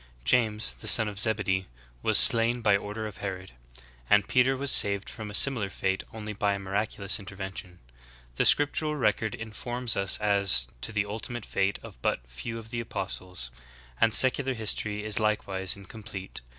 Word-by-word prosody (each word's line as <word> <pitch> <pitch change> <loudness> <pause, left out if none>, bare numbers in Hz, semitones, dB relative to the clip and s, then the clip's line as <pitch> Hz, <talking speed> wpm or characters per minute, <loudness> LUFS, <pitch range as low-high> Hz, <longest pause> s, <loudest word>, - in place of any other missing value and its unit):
^ - - -23
James, 110 - +2
the - - -11
son 110 -2 +4
of 100 -2 -6
Zebedee, 100 -4 -1 0.3
was - - +3
slain 115 +1 +7
by 105 -3 +3
order 105 +2 -5
of 105 - -8
Herod/ 95 -2 -6 0.6
and 105 -1 +3
Peter 130 +1 +2
was 140 0 +2
saved 100 -1 +4
from 110 -2 -8
a 105 - -4
similar 120 -7 +4
fate 95 0 -2
only 105 -1 -7
by 100 0 -1
a - - -6
miraculous 100 +1 -2
intervention.'" 95 -2 -8 0.6
The - - +2
scriptural 150 +1 +3
record 110 -4 -1
informs 120 +2 -3
us 95 0 +2
as 100 - +3 0.2
to - - -3
the 105 -1 -1
ultimate 110 +2 -6
fate 100 0 -1
of - - -13
but - - -2
few 65 - -7
of 115 0 -11
the 120 - -3
apostles; 90 - -5 0.5
and 115 - +4
secular 130 +2 +4
history 105 -1 -1
is 110 0 -1
likewise 100 -3 -1
in 100 -1 -14
complete. 95 -2 -9
105 Hz, 175 wpm, -27 LUFS, 95-115 Hz, 0.6 s, slain